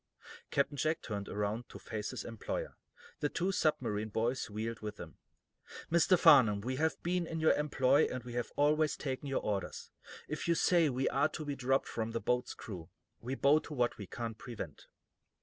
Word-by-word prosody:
Captain 140 +1 +1
Jack 155 +4 +1
turned 100 -3 -4
around 105 +4 -2
to - - -9
face 110 -2 -5
his - - -5
employer; 115 -2 -4 0.4
the 145 - +1
other - - -12
two 185 +3 +1
submarine 115 - 0
boys 115 +4 -1
wheeled 110 +2 -4
with 105 -1 -6
him. - - -10 0.7
"Mr. 170 +2 +5
Farnum, 115 -11 +7
we 130 +5 -3
have 160 +2 +1
been 175 -1 0
in 165 0 -3
your 160 - +5
employ, 145 -1 +3
and 130 -2 -4
we 120 0 -8
have 120 -2 -2
always 150 +1 +3
taken 135 0 -4
your 135 - -1
orders. 100 -3 -3 0.4
If 150 +3 -4
you 170 - +3
say 170 -2 +4
we 130 0 0
are 140 +1 +2
to 155 - -6
be 145 -1 -2
dropped 135 0 +1
from 115 0 -3
the 115 - 0
boat's 125 +1 -1
crew, 90 -7 -8 0.3
we 125 +3 -4
bow 140 +3 +5
to 155 - -8
what 120 -3 0
we 100 - -6
can't 115 +1 -5
prevent." 120 -2 -7
130 Hz, 195 wpm, -33 LUFS, 110-150 Hz, 0.7 s, Farnum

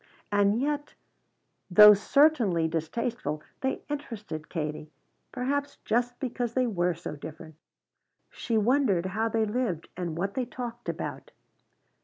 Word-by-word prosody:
And 205 +2 +3
yet, 290 +2 -2 0.7
though 210 +3 +10
certainly 210 - +3
distasteful, 160 0 -3 0.2
they 265 - -2
interested 215 - -6
Katie, 150 -2 -4 0.4
perhaps 280 +3 -2
just 245 +2 0
because 245 -2 -3
they 255 -1 +3
were 180 -6 0
so 165 -2 -6
different. 155 +2 -9 0.8
She 230 - -2
wondered 220 -5 +2
how 215 +4 -1
they 225 0 +1
lived 210 -7 -2
and 170 -3 -4
what 195 +3 -2
they 255 +2 -1
talked 240 -1 -6
about. - - -5
215 Hz, 125 wpm, -28 LUFS, 175-250 Hz, 0.8 s, though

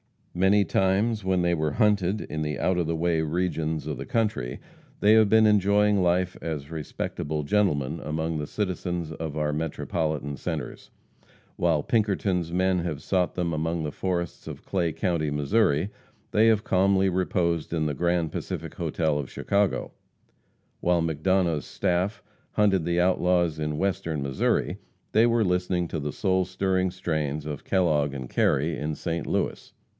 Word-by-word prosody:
Many 95 +3 +4
times 100 +4 +1
when 95 -1 +1
they 85 0 +2
were 80 -3 0
hunted 105 -2 +2
in 80 - -4
the 75 -2 -2
out 95 +5 +1
of 85 -3 0
the 85 - 0
way 80 0 +1
regions 80 -1 -1
of 75 -3 -3
the - - -6
country, 110 - -1 0.4
they 105 +1 +6
have 110 -2 +5
been 110 +1 +6
enjoying 105 -1 +4
life 90 +1 +1
as 75 -2 -5
respectable 75 -1 -4
gentlemen 75 -5 +1
among 80 +1 -2
the 75 - -4
citizens 90 -4 -3
of 80 -1 -5
our 75 -1 0
Metropolitan 75 -2 -2
centers. - - -5 0.7
While 80 -4 +2
Pinkerton's 100 -6 0
men 95 +1 +2
have 80 -4 -4
sought 90 -2 0
them 85 -2 -1
among 80 +1 -1
the 75 - -3
forests 85 -1 -3
of - - -8
Clay 85 -4 0
county, 80 -1 -1
Missouri, 75 +4 +1 0.4
they 110 +2 +4
have 110 -2 +3
calmly 95 0 +3
reposed 85 -3 0
in 80 -2 0
the 75 - 0
Grand 85 +2 0
Pacific - - -5
hotel 80 -3 0
of 70 - -5
Chicago; 100 -1 0 0.9
while 85 -1 +2
McDonough's 80 -1 +1
"staff" 95 +6 -1 0.3
hunted 100 -5 +2
the 85 0 +1
outlaws 90 -3 +2
in 75 -1 -2
Western 80 -5 -1
Missouri, 70 -1 0 0.3
they 115 +2 +5
were 115 -1 +3
listening 90 -2 0
to 80 - -3
the 75 0 -4
soul 95 -2 +1
stirring 95 0 0
strains 75 -4 -2
of 75 -2 -6
Kellogg 75 -7 +2
and 65 -2 -6
Carey 80 +4 +1
in 75 +1 -3
St. 85 -1 -3
Louis. - - -2
85 Hz, 160 wpm, -26 LUFS, 75-95 Hz, 0.9 s, they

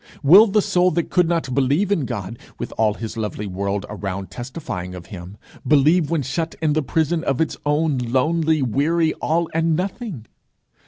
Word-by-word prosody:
Will 190 +11 +8
the 210 0 +2
soul 180 0 +3
that 170 -1 -2
could 180 -2 +3
not 165 -7 -1
believe 140 +10 +1
in 165 -9 +1
God, 115 -2 -5 0.2
with - - -6
all 110 -2 +1
his 115 0 -6
lovely 105 -1 -3
world 100 +1 -3
around 100 -2 -5
testifying 120 - -6
of 90 -2 -9
him, 90 +2 -9 0.3
believe 155 +3 +4
when 165 -4 0
shut 160 +5 -3
in 155 -2 +1
the 155 - +1
prison 160 +4 0
of 135 -5 -1
its 160 - 0
own 150 -2 +1
lonely, 155 +5 +1
weary 155 +7 +1
all 165 +1 -1
and 165 0 +1
nothing? 185 - -4
145 Hz, 175 wpm, -21 LUFS, 115-165 Hz, 0.3 s, Will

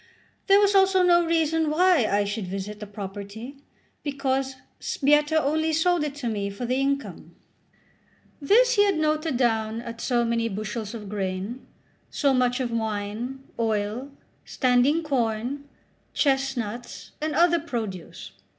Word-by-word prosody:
There 395 0 +7
was 410 0 +4
also 385 -1 +4
no 345 -1 +5
reason 325 -1 +1
why 335 -6 +4
I 205 +1 +2
should 205 -1 -4
visit 195 +3 -5
the 210 - -7
property, 205 +5 -8 0.4
because 270 -2 -1 0.2
Sbietta 295 +2 +2
only 315 +2 0
sold 335 +1 +2
it 290 -2 -3
to 280 -4 -4
me 205 -3 -2
for 200 +5 -5
the 250 +2 0
income. 275 +1 -2 1.1
This 480 - +4
he 410 - +6
had 395 -4 +1
noted 310 -2 0
down 225 -2 0
at 235 -1 -8
so 240 -2 +1
many 230 0 0
bushels 215 +2 -5
of 210 -3 -8
grain, 195 +4 -4 0.4
so 280 -2 +1
much 250 0 +2
of 250 -2 -2
wine, 220 +4 -3 0.2
oil, 220 +3 -1 0.3
standing 255 +6 +2
corn, 255 0 -1 0.5
chestnuts, 270 -5 -1
and 305 -1 -2
other 340 +1 +4
produce. 210 - -6
255 Hz, 140 wpm, -25 LUFS, 220-305 Hz, 1.1 s, There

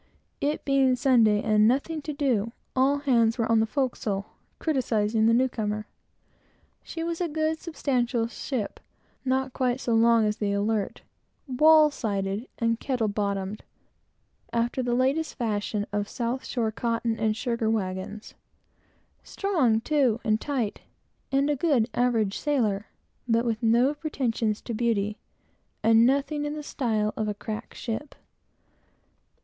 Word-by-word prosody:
It 295 +2 -1
being 270 -2 +3
Sunday, 230 -5 +4
and 215 0 +4
nothing 285 +6 0
to 300 - -5
do, 245 -6 0 0.2
all 270 +2 +3
hands 235 -5 +2
were 230 - +1
on 230 0 +3
the 220 - +2
forecastle, 220 -7 -2 0.3
criticising 225 -7 +1
the 230 - +4
new 260 +2 +3
comer. 215 -3 -3 1.0
She 330 - -6
was 335 +1 -3
a 350 - +1
good, 315 +1 -1
substantial 250 -8 -1
ship, 230 -1 -4 0.4
not 265 0 0
quite 250 -1 0
so 235 - -1
long 230 0 +5
as 210 0 0
the 200 -1 -1
Alert, 205 0 -1 0.4
and 255 -1 -6
wall 310 -1 +7
sided 200 -1 -2
and 230 -1 0
kettle 245 -5 -1
bottomed, 200 0 -2 0.9
after 235 +2 0
the 240 -1 0
latest 270 +6 +1
fashion 210 -3 -2
of 205 0 -1
south 240 +2 -3
shore 230 -3 -1
cotton 230 0 -1
and 220 -1 +1
sugar 235 -3 -1
wagons; 200 0 -3 0.9
strong, 300 - +1
too, 260 -5 +2
and 215 0 +1
tight, 255 -8 -2 0.5
and 275 +1 +2
a 295 - +1
good 270 -6 +2
average 230 -5 +1
sailor, 220 -9 0 0.4
but 230 0 +2
with 225 -2 -1
no 240 +5 +3
pretensions 245 -8 -2
to 235 - -5
beauty, 215 -2 0 0.6
and 225 +1 +6
nothing 280 +2 0
in 295 +1 -3
the 300 - -6
style 220 -7 -1
of 215 - -2
a 210 - -2
"crack 215 +1 -6
ship." 250 +5 -5
235 Hz, 145 wpm, -26 LUFS, 215-270 Hz, 1.0 s, wall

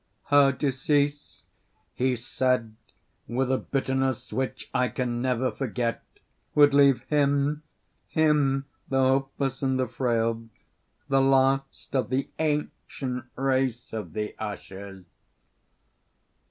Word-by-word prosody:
"Her 140 -1 +6
decease," 145 +2 -1 0.5
he 130 0 +1
said, 120 -2 -1 0.5
with 130 +3 0
a 130 - +2
bitterness 130 -2 -1
which 130 0 -3
I 125 0 +2
can 120 +1 -2
never 130 0 0
forget, 120 -2 -2 0.5
"would 145 -1 +6
leave 140 -2 +5
him 145 0 +1 0.5
(him 145 -3 +2 0.2
the 135 - +1
hopeless 135 0 +1
and 130 -1 +1
the 130 - +1
frail) 115 -2 0 0.6
the 135 0 +3
last 135 0 +1
of 125 -4 +1
the 130 +2 -1
ancient 145 -4 -2
race 130 -3 0
of 110 -2 -5
the 105 0 -3
Ushers." 100 -2 -7
130 Hz, 110 wpm, -26 LUFS, 125-135 Hz, 0.6 s, Her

